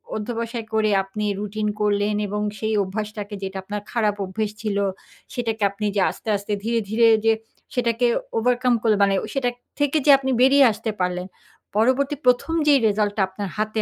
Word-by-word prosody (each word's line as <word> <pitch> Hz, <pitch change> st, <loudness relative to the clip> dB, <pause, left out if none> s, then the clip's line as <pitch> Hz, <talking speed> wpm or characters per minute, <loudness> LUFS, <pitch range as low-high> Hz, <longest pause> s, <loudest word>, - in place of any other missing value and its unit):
অধ্যবসায় 230 Hz, +1 st, -4 dB
করে 215 Hz, -1 st, +2 dB
আপনি 210 Hz, +2 st, -4 dB
রুটিন 210 Hz, +1 st, -3 dB
করলেন 205 Hz, 0 st, +1 dB
এবং 210 Hz, +1 st, -3 dB, 0.2 s
সেই 220 Hz, 0 st, -1 dB
অভ্যাসটাকে 210 Hz, +1 st, -5 dB
যেটা 190 Hz, 0 st, -4 dB
আপনার 205 Hz, +1 st, -5 dB
খারাপ 215 Hz, -3 st, +1 dB
অভ্যাস 210 Hz, +3 st, -3 dB
ছিল, 210 Hz, -2 st, -1 dB, 0.6 s
সেটাকে 225 Hz, -4 st, -2 dB
আপনি 210 Hz, +1 st, -5 dB
যে 195 Hz, -, +2 dB
আস্তে, -, -, -10 dB
আস্তে 205 Hz, +1 st, -4 dB
ধীরে, 230 Hz, 0 st, +1 dB
ধীরে 230 Hz, +1 st, +4 dB, 0.2 s
যে 225 Hz, -, +5 dB, 0.4 s
সেটাকে 240 Hz, 0 st, +1 dB, 0.3 s
ওভারকাম 250 Hz, +1 st, +2 dB
করে 220 Hz, -2 st, +4 dB
মানে 200 Hz, 0 st, +3 dB, 0.2 s
সেটা 260 Hz, -3 st, +1 dB, 0.3 s
থেকে 290 Hz, +1 st, +2 dB
যে 290 Hz, -, +7 dB
আপনি 265 Hz, -1 st, -2 dB
বেরিয়ে 270 Hz, +1 st, +6 dB
আসতে 220 Hz, +1 st, -4 dB
পারলেন। 180 Hz, 0 st, -1 dB, 0.5 s
পরবর্তী 260 Hz, +6 st, +2 dB
১ম 250 Hz, +6 st, +3 dB
যেই 280 Hz, -2 st, +6 dB
রিজাল্টটা 205 Hz, 0 st, 0 dB
আপনার 195 Hz, +1 st, -6 dB
হাতে 215 Hz, +1 st, -1 dB
220 Hz, 165 wpm, -23 LUFS, 205-240 Hz, 0.6 s, যে